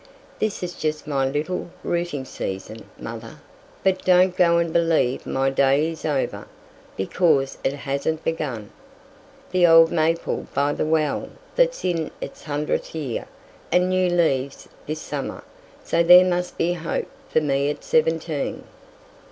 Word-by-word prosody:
This 215 -3 -1
is 175 0 -4
just 155 -2 -3
my 135 -2 0
little 155 +6 -3
'rooting 170 -6 -2
season,' 110 0 -6
mother, - - -8 0.5
but 190 -1 +1
don't 180 0 +4
go 170 -2 +4
and 170 -1 0
believe 165 -7 +1
my 135 0 +1
day 140 +4 +3
is 160 - -8
over, 145 -4 -1 0.5
because 135 - +1
it 135 - +1
hasn't 140 +3 -2
begun! 135 -10 -3 0.8
The 180 -1 +5
old 165 0 +7
maple 165 0 0
by 145 +1 +2
the 155 - -1
well 155 -2 0 0.3
that's - - +2
in 165 -4 0
its - - -8
hundredth 150 +1 -2
year 140 -7 -4 0.4
had 180 - +4
new 185 0 +2
leaves 140 -6 0 0.2
this 155 +1 -3
summer, - - -5 0.4
so - - +1
there 180 +2 +8
must 180 0 -1
be 175 +1 +1
hope 165 -1 -3 0.2
for - - +3
me 140 -1 +1
at 150 - -5
seventeen!" 480 0 0
160 Hz, 145 wpm, -23 LUFS, 140-175 Hz, 0.8 s, there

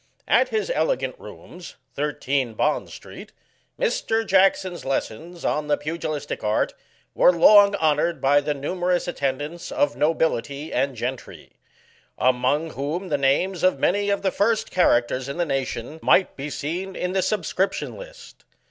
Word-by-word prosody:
At - - +3
his 440 +3 -1
elegant - - 0
rooms, 180 -1 -12 0.2
13, 140 -4 -2
Bond - - 0
street, - - -11 0.5
Mr. 225 0 0
Jackson's 190 -2 +2
lessons 160 +6 -4
on 150 0 -1
the 145 - +2
pugilistic 150 -3 -4
art 105 0 0 0.4
were - - +5
long 200 +4 +6
honoured 160 -1 +1
by 140 +2 +3
the 145 0 -2
numerous 175 +5 -1
attendance 145 +1 -3
of 145 0 +1
nobility 150 -2 -1
and 135 -1 0
gentry; 125 +2 -6 0.7
among 130 +5 +1
whom 160 +8 -4
the 145 - +1
names 160 +7 +1
of 185 - +3
many 205 +2 +1
of 200 0 0
the 190 - +1
first 220 +3 0
characters 130 -6 +2
in 140 - -5
the 175 - +1
nation 135 0 -3
might 190 - +3
be 140 +2 -5
seen 175 +7 -4
in 180 - -2
the 190 - +1
subscription 190 -1 -1
list. - - -13
160 Hz, 145 wpm, -23 LUFS, 140-185 Hz, 0.7 s, long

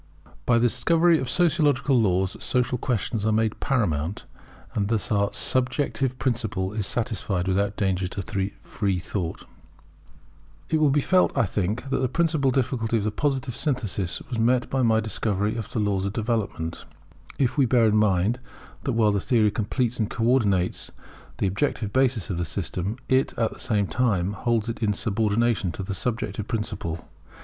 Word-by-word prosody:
[By 120 - +5
the 115 - +3
discovery 165 +8 +3
of 130 - -3
Sociological 155 -5 +2
laws 95 -2 +1
social 125 -1 +1
questions 115 -3 -1
are 110 - +2
made 110 0 +1
paramount; 95 - -1 0.5
and 100 -2 0
thus 110 -1 -1
our 100 -1 +2
subjective 130 0 +1
principle 110 -7 -1
is 105 -2 0
satisfied 105 -6 -1
without 100 +2 +1
danger 95 -3 0
to 100 +1 -3
free 100 -3 -1
thought] 90 -1 -4 1.3
It 160 - +3
will 155 -2 +4
be 145 +1 +3
felt, 185 +5 +2
I - - +4
think, 105 +7 -2
that - - +1
the 130 -1 0
principal 160 -4 +1
difficulty 120 -3 0
of 105 - -1
the 110 - 0
Positive 135 0 -1
Synthesis 125 - -2
was 120 - -3
met 120 +2 +2
by 135 - +1
my 110 -2 +3
discovery 105 -1 -1
of 115 -3 -5
the - - -4
laws 100 -3 0
of 100 - -4
development, 110 -8 -2 0.5
if 130 -4 +1
we 140 -4 +3
bear 120 -1 +4
in 105 -1 +3
mind 105 +3 +2 0.5
that 130 - 0
while 110 -2 +3
that 100 -1 0
theory 110 -4 +3
completes 120 +3 -1
and 110 - 0
co 115 - -3
ordinates 105 -7 +2 0.5
the - - 0
objective 100 +1 -1
basis 130 -7 +1
of 85 - -2
the 85 - -1
system, 90 +5 -3
it 130 +1 +1
at 115 -1 0
the - - -14
same 105 -5 +1
time 100 -4 0
holds 115 +1 0
it 115 +1 -4
in 105 -2 +2
subordination 110 -1 0
to 100 - -5
the 100 +1 -4
subjective 105 -2 -3
principle. 85 -7 -4
110 Hz, 175 wpm, -25 LUFS, 100-125 Hz, 1.3 s, By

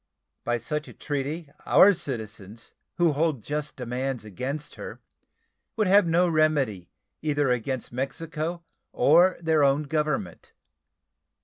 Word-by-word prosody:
By 120 0 0
such 150 +6 -4
a - - -11
treaty 145 +2 -4
our 200 +2 +6
citizens 110 - -7 0.2
who 175 -2 +3
hold 150 -5 0
just 150 0 -4
demands 125 -1 -3
against 135 - -5
her - - -8 0.8
would 215 -2 +1
have 195 -1 +5
no 175 +2 +3
remedy 145 - +1 0.3
either 145 -3 +1
against 125 +1 -2
Mexico 160 +6 -4 0.3
or 175 +5 +4
their 160 -3 +2
own 140 +2 +3
Government. 150 - -3
145 Hz, 120 wpm, -26 LUFS, 125-160 Hz, 0.8 s, our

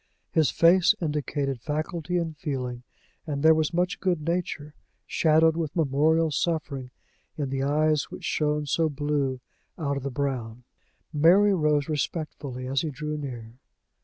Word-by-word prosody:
His 160 -3 +3
face 175 +2 +5
indicated 145 -5 -2
faculty 155 +4 -2
and 165 -2 -2
feeling, 130 -6 -4 0.5
and 140 -1 -3
there 160 0 +8
was 155 -1 +1
much 175 +1 0
good 180 -3 +1
nature, 160 -2 -3 0.3
shadowed 160 0 +3
with 160 -3 -3
memorial 160 +1 +2
suffering, 145 -4 -2 0.5
in 140 -3 -2
the 135 0 -1
eyes 150 +2 +2
which - - -10
shone 150 -1 0
so 160 +3 +1
blue 140 -3 -1 0.4
out 140 -5 -1
of - - -4
the 140 - -3
brown. 125 -4 -3 0.5
Mary 180 +7 +5
rose 150 -4 +2
respectfully 145 -4 -3
as 130 +1 0
he 160 - -2
drew 150 +2 -4
near. 125 -5 -7
150 Hz, 145 wpm, -26 LUFS, 140-160 Hz, 0.5 s, there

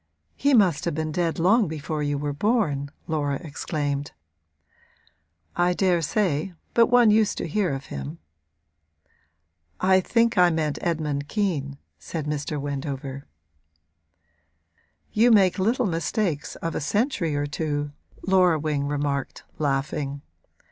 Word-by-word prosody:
'He 280 0 +3
must 180 -7 +3
have 170 - -1
been 155 0 -2
dead 170 0 -1
long 200 +5 +4
before 155 0 -4
you 145 -1 0
were 145 0 -2
born!' 150 - 0 0.2
Laura 145 -3 -1
exclaimed. 145 -2 -3 1.4
'I 175 0 +2
daresay; 180 -1 +1 0.2
but 230 -1 +5
one 245 -3 +5
used 215 -1 +3
to - - -3
hear 185 +1 0
of 135 0 -4
him.' 70 +4 -6 1.6
'I 190 0 +4
think 230 +1 +2
I 180 -1 +7
meant 155 -3 -1
Edmund 150 -4 -1
Kean,' 155 -9 -1 0.2
said 160 -3 -5
Mr. 150 0 -3
Wendover. 140 -1 -5 1.8
'You 230 +3 +4
make 200 -4 +4
little 230 +6 +2
mistakes 165 -2 -1
of 165 0 -4
a - - -2
century 185 - 0
or 145 0 0
two,' 145 -1 -2 0.3
Laura 185 -3 +4
Wing 145 -2 -1
remarked, 145 -1 -2 0.2
laughing. 140 0 -1
155 Hz, 125 wpm, -25 LUFS, 145-190 Hz, 1.8 s, I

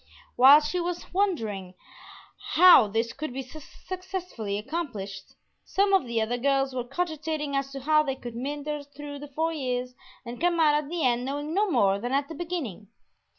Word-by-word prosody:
While 275 +4 +8
she 355 +4 -2
was 350 0 -4
wondering 220 - -1 0.8
how 350 -10 +8
this 225 +3 -1
could 305 0 -5
be 265 +2 -5
successfully 315 - -6
accomplished, 210 - -5 0.3
some 395 +1 +1
of 375 -10 +3
the 235 -1 -1
other 235 +3 -1
girls 270 0 +1
were 250 -1 -2
cogitating 310 0 -3
as 275 0 -1
to 275 - -6
how 305 +3 +4
they 275 -3 -2
could 240 -3 -9
meander 290 +4 -4
through 285 0 -9
the 290 - -8
four 320 +4 -1
years 250 -4 -3 0.3
and 240 +3 -8
come 345 -1 +2
out 305 -2 +5
at 295 -1 0
the 340 -1 -2
end 245 -1 +2
knowing 290 +4 -4
no 410 +3 +2
more 200 - +3
than 245 +4 -3
at 280 +2 0
the - - -6
beginning. 310 - -5
280 Hz, 180 wpm, -27 LUFS, 245-320 Hz, 0.8 s, While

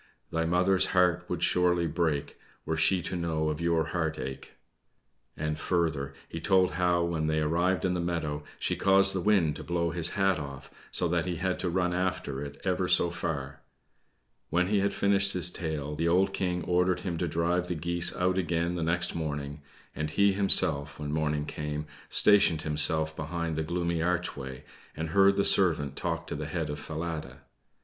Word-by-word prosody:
Thy 80 0 0
mother's 90 +3 +2
heart 90 -1 +3
would 90 -1 -2
surely 90 -1 +2
break 80 -3 -1 0.3
Were 80 - -1
she 85 +3 +3
to - - -3
know 80 -3 -1
of 75 +1 -3
your 85 -1 +2
heart 80 -3 -2
ache!" 65 -1 -7 0.8
And, 75 0 -2
further, 80 -7 -1
he 80 - -6
told 95 +1 +3
how 90 -1 +1
when 80 -2 -1
they 80 0 +1
arrived 85 +3 +1
in 90 - +1
the 90 - -1
meadow, 80 -4 -2
she - - -1
caused 95 0 +4
the 95 - -1
wind 90 -7 +2
to - - -8
blow 85 +2 -1
his 85 +3 -2
hat 95 -3 +2
off, 70 -2 -8 0.2
so 90 - 0
that 85 0 0
he 90 - -2
had 90 +2 -2
to 90 - -1
run 90 0 0
after 90 -7 -2
it 70 0 -9
ever - - 0
so 85 - +3
far. 70 -5 -4 0.9
When 90 +2 +1
he 105 -1 +2
had 100 +1 +1
finished 100 -1 +2
his 90 -1 0
tale, 75 -4 -4
the 80 +3 -1
old 95 +3 +2
King 90 -3 -1
ordered 90 +1 +1
him 85 -4 -3
to 90 - 0
drive 85 +2 0
the 90 - -2
geese 85 +2 +1
out 90 +1 +1
again 85 -1 -1
the 90 - -3
next 90 +2 0
morning; 75 -2 -4 0.3
and 75 0 -2
he 100 +5 +3
himself, 80 -7 +2
when 75 -1 -5
morning 75 -1 -1
came, 75 0 -4 0.2
stationed 90 -7 +4
himself 80 +1 +1
behind 80 +1 -3
the 80 - -1
gloomy 85 +1 -1
archway, 80 -7 -3 0.3
and 80 +1 -3
heard 100 +2 +5
the 100 - +2
servant 75 -7 +4
talk - - -3
to - - -6
the 75 0 -5
head 80 -2 -3
of 75 - -5
Falada. 75 -4 -5
85 Hz, 190 wpm, -28 LUFS, 75-90 Hz, 0.9 s, heard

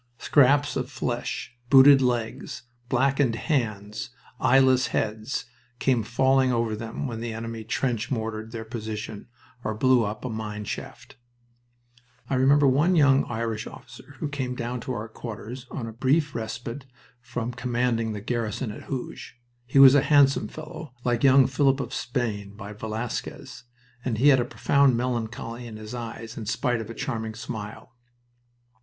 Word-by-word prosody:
Scraps 145 +3 +4
of 130 -1 -2
flesh, 120 -3 -3 0.2
booted 135 +1 +8
legs, 120 -2 -2 0.3
blackened 135 -1 +2
hands, 110 -7 -2 0.3
eyeless 130 0 +4
heads, 110 +4 -2 0.3
came 125 -1 +2
falling 130 +3 +2
over 115 -2 0
them 115 +5 -5
when 115 -4 -4
the 115 0 -4
enemy 115 0 -5
trench 120 +1 -1
mortared 110 -2 -3
their 115 -1 -6
position 110 -2 -6 0.4
or 110 0 -2
blew 130 +1 +4
up 105 +3 -4
a - - 0
new 115 - -4
mine 105 -1 -5
shaft. 135 +5 -7 1.1
I - - +2
remember 140 +3 +4
one 145 +7 +4
young 140 -3 +5
Irish 115 -1 -3
officer 120 +3 -13
who 155 - -3
came 130 -3 -3
down 120 +1 -3
to 120 - -5
bur 115 -2 -4
quarters 115 +3 -8
on 120 - -5
a 115 - -7
brief 140 +5 +1
respite 115 +4 -5 0.3
from 120 0 -4
commanding 120 -2 0
the 105 - -5
garrison 115 +1 -2
at - - -10
Hooge. 130 -2 -6 0.3
He 130 - 0
was 135 -1 +10
a 145 - +6
handsome 140 -2 +4
fellow, 155 -3 -9
like 120 0 0
young 135 -1 +7
Philip 135 +1 +2
of 125 -2 -4
Spain 105 -6 -3
by 100 0 -8
Velasquez, 110 +3 -5 0.4
and 120 -4 -1
he 140 +6 +5
had 135 -2 +6
a 120 - +1
profound 140 0 +3
melancholy 120 -1 -3
in 110 -2 -8
his 110 +1 -8
eyes 115 -1 -7
in 110 -3 -6
spite 120 +1 0
of 110 - -8
a 115 - -7
charming 110 -5 -3
smile. 110 -2 -7
120 Hz, 160 wpm, -26 LUFS, 110-135 Hz, 1.1 s, was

